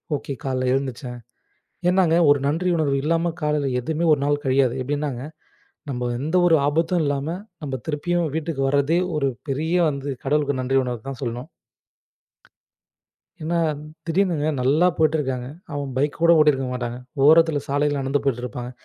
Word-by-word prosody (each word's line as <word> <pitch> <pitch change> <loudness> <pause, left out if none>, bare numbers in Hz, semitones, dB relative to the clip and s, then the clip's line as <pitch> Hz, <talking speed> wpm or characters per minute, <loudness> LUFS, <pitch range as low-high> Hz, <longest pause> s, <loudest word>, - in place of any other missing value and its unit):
Okay 140 0 -5
காலையில 130 -1 0
எழுந்திருச்சேன். 125 -2 -4 0.7
ஏன்னாங்க 180 -3 +3
1 145 - +5
நன்றி 170 +5 0
உணர்வு 145 -4 +1
இல்லாம 165 +1 +1
காலையில 150 -2 +1
எதுவுமே 160 +6 -2
1 145 - +2
நாள் 145 0 0
கழியாது. 130 -2 +2
எப்டின்னாங்க, 140 -2 -3 0.7
நம்ப 125 -2 -2
எந்த 155 +6 -1
1 165 -2 +5
ஆபத்தும் 165 +3 +1
இல்லாம 140 +1 -1 0.4
நம்ப 135 -2 -4
திருப்பியும் 165 +1 0
வீட்டுக்கு 160 -3 -2
வர்றதே 140 +5 +2 0.2
1 140 -2 +1 0.2
பெரிய 160 +6 -1 0.2
வந்து 140 0 -5 0.2
கடவுளுக்கு 145 -1 +1
நன்றி 135 +1 +1
உணர்வத்தான் 125 +1 -5
சொல்லணும். 125 +5 -4 1.9
ஏன்னா 170 +2 -1 0.5
திடீர்னுங்க 165 -3 +1
நல்லா 150 +8 +3
போயிட்டுருக்காங்க. 140 -6 0 0.3
அவன் 140 -2 -3
பைக் 145 +2 0
கூடப் 170 -1 +6
ஓட்டிருக்க 140 -4 +3
மாட்டாங்க. 120 -1 -4 0.3
ஓரத்துல 160 -2 +5
சாலையில 145 0 +1
நடந்து 135 +1 0
போயிட்டு 125 -3 0
இருப்பாங்க. 125 +1 -6
145 Hz, 140 wpm, -23 LUFS, 135-160 Hz, 1.9 s, கூடப்